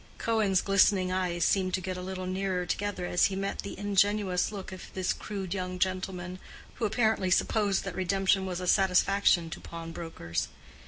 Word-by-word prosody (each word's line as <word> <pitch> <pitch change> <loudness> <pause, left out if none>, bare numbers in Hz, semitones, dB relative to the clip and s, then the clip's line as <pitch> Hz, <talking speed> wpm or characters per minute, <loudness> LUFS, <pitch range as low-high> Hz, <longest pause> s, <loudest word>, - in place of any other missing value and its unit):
Cohen's 215 -5 +2
glistening 195 -1 +3
eyes 180 -2 0
seemed 185 -2 +2
to - - -2
get 185 0 -4
a 180 - -5
little 185 0 -5
nearer 185 -1 -1
together 200 -1 -2
as 175 - +3
he 195 - 0
met 195 +1 -3
the 200 - -5
ingenuous 205 -2 +1
look 195 -3 -7
of 185 - -8
this 185 -1 0
crude 195 -4 -5
young 185 -1 -3
gentleman, 185 -1 -2 0.4
who 235 - 0
apparently 220 -3 +1
supposed 200 +1 +2
that 195 - -5
redemption 190 +1 +1
was 180 -1 -3
a 180 - -4
satisfaction 185 -2 +3
to - - -6
pawnbrokers. 165 - -5
185 Hz, 170 wpm, -29 LUFS, 180-195 Hz, 0.4 s, glistening